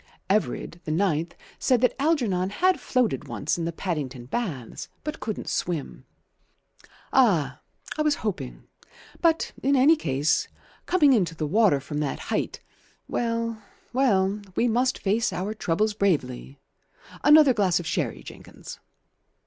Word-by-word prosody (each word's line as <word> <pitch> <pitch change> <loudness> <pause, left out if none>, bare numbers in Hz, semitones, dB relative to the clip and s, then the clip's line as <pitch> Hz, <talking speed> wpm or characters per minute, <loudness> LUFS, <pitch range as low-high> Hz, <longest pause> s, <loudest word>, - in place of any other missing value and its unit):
Everard, 195 -4 -1
the - - -6
ninth, 170 -1 0 0.2
said 255 -3 +3
that 250 - +3
Algernon 235 - +1
had 365 - +2
floated 250 - 0
once 155 +4 -2
in 165 - -2
the 170 - -1
Paddington 145 -8 -4
Baths, 145 - -4
but 305 +1 -5
couldn't 215 -1 -5
swim. 170 -5 -3 1.1
"Ah! 165 - +3 0.4
I - - +3
was 300 -1 +2
hoping 60 - -4 0.6
But 325 -1 +2
in 280 +1 +2
any 280 +5 +6
case, 150 - 0 0.4
coming 300 -7 +5
into 180 -8 +1
the 155 - -2
water 195 -2 +3
from 145 +2 -5
that 150 -2 -2 0.2
height - - -2 0.5
Well, 230 -1 -2 0.3
well, 205 -6 +2
we 245 - +2
must 250 +2 +1
face 215 +4 0
our 195 +4 -3
troubles 210 +1 0
bravely. 140 - -1 0.7
Another 295 -2 +7
glass 190 -6 +2
of 175 - -6
sherry, - - -2
Jenkins." - - -11
200 Hz, 135 wpm, -25 LUFS, 160-250 Hz, 1.1 s, Another